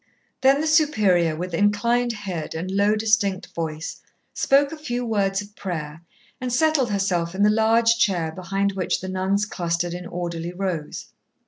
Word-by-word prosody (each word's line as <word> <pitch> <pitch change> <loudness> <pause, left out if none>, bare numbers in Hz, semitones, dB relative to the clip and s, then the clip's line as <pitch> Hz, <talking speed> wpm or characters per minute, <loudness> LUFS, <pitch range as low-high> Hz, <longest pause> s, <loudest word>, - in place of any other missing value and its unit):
Then 270 +2 +4
the - - -1
Superior, 210 - +3
with 180 +2 -5
inclined 235 +6 +2
head 190 -9 -5
and 175 +4 -4
low, 200 +2 +3
distinct 210 -3 0
voice, 160 -1 -5 0.3
spoke 280 +1 +3
a - - -5
few 245 -6 -3
words 200 -3 0
of 205 0 -16
prayer, 160 -4 -5 0.4
and 250 -1 -2
settled 275 -1 +2
herself 185 -4 -1
in 200 - +1
the 210 - +5
large 225 +1 +3
chair 175 -8 +1
behind 195 +3 -1
which 190 -2 -1
the 185 - -6
nuns 190 +2 0
clustered 175 -3 -2
in 180 0 -6
orderly 170 -1 -4
rows. 180 -5 -4
195 Hz, 160 wpm, -23 LUFS, 175-225 Hz, 0.4 s, the